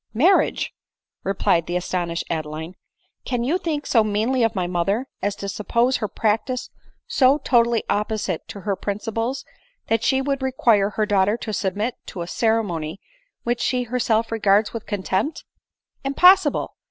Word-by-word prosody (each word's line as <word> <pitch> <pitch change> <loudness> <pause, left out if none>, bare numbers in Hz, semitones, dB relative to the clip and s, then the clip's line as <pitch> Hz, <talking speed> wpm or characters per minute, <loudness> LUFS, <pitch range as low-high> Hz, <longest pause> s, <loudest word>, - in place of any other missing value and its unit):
"Marriage 345 - +3 0.3
!" - - -64
replied 170 -4 +1
the 175 - -2
astonished 175 -1 -2
Adeline; 160 +1 -4 0.5
"can 245 -2 -2
you 315 +9 +1
think 310 -5 -2
so 225 -3 +4
meanly 220 +5 0
of 225 -1 +2
my 185 -2 0
mother, 185 +7 0 0.2
as 200 +1 -1
to 200 - -6
suppose 235 +6 +1
her 215 - -2
practice 225 +5 -1 0.3
so 265 +1 +4
totally 235 -5 +2
opposite 210 -4 -2
to 200 - -8
her 200 0 -1
principles, 225 +7 -3 0.4
that 225 -1 +1
she 265 0 +3
would 275 0 -1
require 235 -6 +3
her 215 +1 -1
daughter 205 +1 +2
to 220 -2 -5
submit 205 +5 -1
to 175 - -5
a - - -8
ceremony 195 -7 -1 0.4
which 240 0 -1
she 250 -1 +1
herself 230 -2 0
regards 210 -1 +2
with 230 - -6
contempt? 205 +7 -2 0.6
Impossible 360 +8 +4
220 Hz, 155 wpm, -22 LUFS, 195-250 Hz, 0.6 s, so